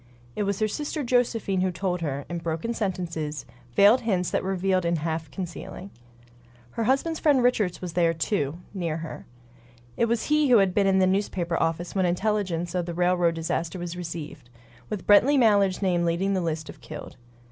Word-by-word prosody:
It - - -2
was 200 - -1
her 215 - +2
sister 295 +6 -3
Josephine 235 -6 +1
who 185 - +2
told 180 0 -2
her, 140 -3 -3
in 170 -1 -4
broken 165 +7 -3
sentences; 170 -8 -3 0.3
veiled 205 +6 +6
hints 185 -6 0
that - - 0
revealed 190 -1 0
in 170 0 +1
half 160 0 -3
concealing. 180 +3 -7 0.8
Her 230 - -2
husband's 275 +6 +1
friend 280 -5 +3
Richards 210 -8 +1
was 175 -2 -5
there, 170 -1 +3
too, 165 -2 -1 0.2
near 170 -5 -2
her. - - -9 0.7
It - - +3
was 230 0 0
he 300 -2 +2
who 245 - +7
had 195 -3 +3
been 200 0 +3
in 190 0 +3
the 190 - +4
newspaper 185 -3 0
office 165 +1 -1
when 190 -2 +2
intelligence 180 -2 -1
of 180 -1 -1
the 170 - -4
railroad 175 -1 +2
disaster 165 +1 -2
was 175 -1 -5
received, 160 -7 -7 0.4
with 205 -4 -4
Brently 255 +8 +6
Mallard's 205 -5 +3
name 175 -2 +2
leading 170 +4 +1
the 190 - 0
list 160 -2 -3
of - - -11
"killed." 155 -1 -9
180 Hz, 185 wpm, -26 LUFS, 170-205 Hz, 0.8 s, who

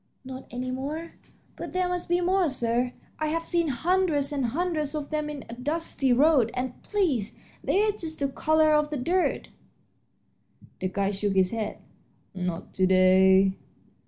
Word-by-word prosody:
"Not 260 0 -8
any 255 +1 -4
more? 295 +6 -5 0.4
But - - -7
there 365 0 +1
must 360 -1 -3
be 350 0 +2
more, 365 -1 +2
sir; 245 -1 0 0.3
I've 315 +2 -1
seen 340 -2 +1
hundreds 305 +1 +1
and 270 -4 0
hundreds 310 +2 -1
of 295 -1 -5
them 300 -1 -1
on 290 -2 -6
a 230 - -8
dusty 275 +1 -1
road, 265 -2 +4
and, 250 0 -4
please, 310 - -1 0.3
they're 420 +2 +2
just 330 -6 -6
the 280 -1 0
color 310 +2 +2
of 300 0 +2
the 300 - -3
dirt." 345 +8 0 1.3
The 185 - -1
guide 195 +2 -1
shook 200 0 -1
his 185 -1 +3
head. 220 -2 -4 0.5
"Not 180 -2 -4
to 185 -1 +2
day." 190 +1 +5
285 Hz, 160 wpm, -26 LUFS, 230-330 Hz, 1.3 s, day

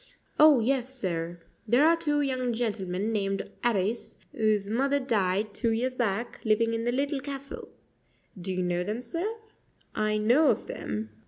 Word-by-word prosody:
"Oh, 300 -3 +8
yes, 260 +2 0
sir; 170 -4 -3 0.3
there 245 +7 +5
are 335 - +6
two 295 -3 0
young 255 -3 0
gentlemen 210 -3 -2
named 195 -2 -1 0.2
'Arris, 220 -1 0 0.2
whose 215 -2 +1
mother 275 +6 +1
died 210 -4 0
two 230 - 0
years 240 +3 0
back, 235 -2 -2
living 230 +1 +2
in 230 0 -2
the 240 - +2
Little 280 +2 0
Castle. 275 0 -7 0.7
Do 190 +2 -2
you 185 0 -1
know 175 0 0
them, 215 +6 -4
sir?" 340 - -3 0.6
"I 215 0 0
know 245 +9 +4
of - - +1
them." 105 +1 -5
230 Hz, 160 wpm, -28 LUFS, 200-265 Hz, 0.7 s, Oh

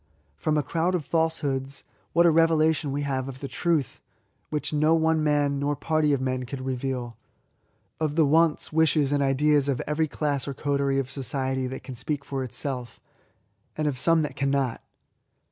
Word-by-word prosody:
From 155 - 0
a 150 - +1
crowd 170 +6 0
of 160 -5 -2
falsehoods, 140 -5 -1 0.3
what 170 0 +4
a 170 - +6
revelation 160 -2 +3
we 145 +1 -2
have 135 -1 -2
of 130 -1 -9
the 140 - -5
truth, 155 -1 -1 0.5
which 150 0 -3
no 155 +2 +3
one 160 -1 +2
man, 145 -2 +1
nor 145 +1 0
party 155 0 +1
of 140 - +2
men, 130 -1 -2
could 130 +1 -6
reveal 130 -2 -3 0.8
!^K)f 155 -2 -1
the 160 -2 +4
wants, 160 +1 +2
wishes, 155 -3 +3
and 145 -1 +2
ideas 140 +1 +2
of 135 - 0
every 155 +1 0
class 145 -3 -2
or 140 - -4
coterie 140 -1 0
of 130 -2 -2
society 130 -1 -2
that 130 +1 -7
can 130 - -7
speak 140 +4 -4
for 135 -1 -3
itself, 125 -2 -5 0.8
and 155 -1 0
of 135 -4 0
some 160 +4 +4
that 145 -3 -4
'cannot! 140 -3 0
145 Hz, 180 wpm, -26 LUFS, 135-155 Hz, 0.8 s, a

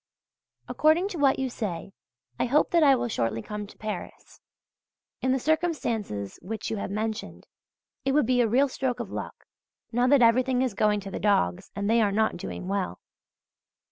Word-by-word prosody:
According 320 +6 +3
to 350 - -6
what 275 -2 +4
you 265 - -1
say, 195 -7 -5 0.5
I - - +2
hope 275 +5 +2
that 340 - +4
I 280 -3 +6
will 240 -1 -1
shortly 115 - -1
come 210 -1 -6
to - - -16
Paris. 215 -3 -7 0.8
In 260 - +1
the 265 - +3
circumstances 240 - -1
which 215 +5 -5
you 220 - -2
have 200 - -4
mentioned, 215 +2 -4 0.6
it 270 - +1
would 295 -3 +4
be 245 +1 +3
a 235 - +3
real 265 +5 +4
stroke 255 -2 -2
of 225 -5 -5
luck, - - -7 0.5
now 245 +2 +2
that 270 -2 +5
everything 250 +2 +3
is 255 -5 -1
going 210 +1 +2
to 195 0 -8
the - - -4
dogs, 90 - +1
and 200 0 -2
they 230 +1 +4
are 205 -2 +2
not 220 +2 +1
doing 180 +1 -6
well. 195 -1 -2
230 Hz, 185 wpm, -27 LUFS, 205-265 Hz, 0.8 s, I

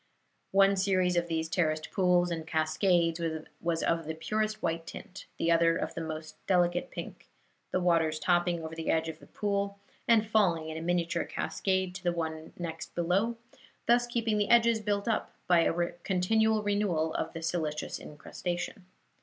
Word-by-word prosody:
One 195 0 +5
series 185 -2 +2
of 175 0 +1
these 160 -1 -1
terraced 155 -2 0
pools 180 -2 +3
and 160 -1 -4
cascades 165 +2 +2 0.4
was 165 -1 0
of 165 -1 +1
the 160 - -3
purest 215 +6 -1
white 165 -1 -1
tint, 190 - -9
the 170 - +1
other 165 0 +4
of - - -3
the 165 - -4
most 155 -1 -7
delicate 175 +4 +2
pink, - - -8 0.4
the - - 0
waters 165 -3 +2
topping 175 0 +1
over 160 0 -6
the 165 0 -4
edge 160 0 +1
of 160 0 -8
each - - -17
pool 200 -1 -1 0.3
and 225 -2 +5
falling 180 -8 +2
in 160 - -5
a - - -5
miniature 175 0 0
cascade 190 -2 -1
to 185 0 -8
the 175 - +2
one 160 -1 -4
next 165 -2 -6
below, 195 +7 +1 0.5
thus 240 0 +4
keeping 225 -3 0
the 205 - 0
edges 235 -1 +5
built 205 0 -1
up 225 - -1
by 175 -1 +5
a 170 +1 +1
continual 215 +4 +2
renewal 195 -6 +1
of - - -3
the 165 - -6
silicious 160 -3 -2
incrustation. 175 +4 -5
175 Hz, 170 wpm, -30 LUFS, 165-200 Hz, 0.5 s, One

